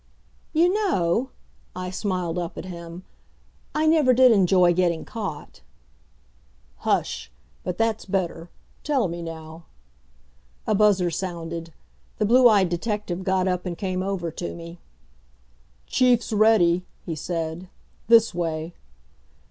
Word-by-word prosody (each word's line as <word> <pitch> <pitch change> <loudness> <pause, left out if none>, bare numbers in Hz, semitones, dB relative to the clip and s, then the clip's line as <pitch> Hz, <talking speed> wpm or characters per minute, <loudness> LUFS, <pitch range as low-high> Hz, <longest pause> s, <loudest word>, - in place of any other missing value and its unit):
"You 345 +3 +3
know," 260 - +1 0.5
I 180 0 -5
smiled 180 -3 -2
up 170 -1 -5
at - - -6
him, 170 0 -8 0.7
"I 305 +1 +1
never 310 -5 +4
did 255 0 +7
enjoy 185 -4 +4
getting 175 -2 0
caught." 200 -10 -7 1.2
"Hush! - - -1 0.3
But 180 - -4
that's 225 -1 0
better.... 175 -3 -2 0.3
Tell 275 -8 +1
me 170 0 -6
now 160 0 -9 0.5
" 60 0 -36
A - - +1
buzzer 195 -4 +3
sounded. 165 -2 -5 0.5
The 215 - +1
blue 245 +3 +6
eyed 200 -5 +4
detective 190 0 -3
got 190 0 +1
up 180 -1 -1
and 175 -2 -4
came 185 -1 -2
over 185 -3 -3
to 170 - -6
me. 170 0 -10 1.1
"Chief's 245 -2 +2
ready," 205 -5 +4 0.2
he 170 - -3
said. 165 +2 -4 0.4
"This 230 -1 +5
way." 165 -1 -3
180 Hz, 125 wpm, -24 LUFS, 170-215 Hz, 1.2 s, did